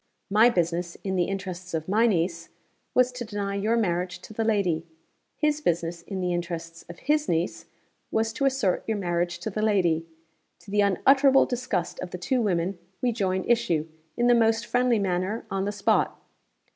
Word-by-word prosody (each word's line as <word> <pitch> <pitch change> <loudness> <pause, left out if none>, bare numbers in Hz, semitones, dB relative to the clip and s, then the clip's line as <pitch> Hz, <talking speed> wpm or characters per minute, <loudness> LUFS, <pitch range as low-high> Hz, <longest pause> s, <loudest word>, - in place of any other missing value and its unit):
My 220 +4 +6
business, 170 -3 -1
in 190 -1 -2
the 175 -1 +2
interests 185 -2 -5
of 160 -1 -3
my 220 +5 +3
niece, 170 -4 -1 0.5
was 250 0 +4
to 250 -1 -6
deny 205 -3 -3
your 215 +4 +1
marriage 180 -4 0
to 215 - -11
the 225 - -1
lady. 195 -7 +1 0.5
His 300 -1 +1
business, 170 - -1
in 190 +2 -5
the 180 -1 0
interests 170 -1 -5
of 170 - -9
his 300 0 +1
niece, 165 +2 -1 0.4
was 220 0 0
to 275 +3 -1
assert 260 -9 +1
your 220 -1 0
marriage 175 -2 -1
to 220 - -3
the 215 - -2
lady. 175 -7 +2 0.5
To 200 - -12
the 205 0 +3
unutterable 270 +8 +5
disgust 245 -8 -2
of 185 - -5
the 180 - -6
two 245 +8 0
women, 180 -3 0 0.2
we 250 - +1
joined 190 -4 -1
issue, 180 -10 +1 0.3
in 240 - +2
the 245 - +6
most 225 0 +3
friendly 245 -1 +2
manner, 190 +2 -1
on 195 0 -1
the 205 - -1
spot. 205 -1 +1
195 Hz, 185 wpm, -26 LUFS, 175-230 Hz, 0.5 s, My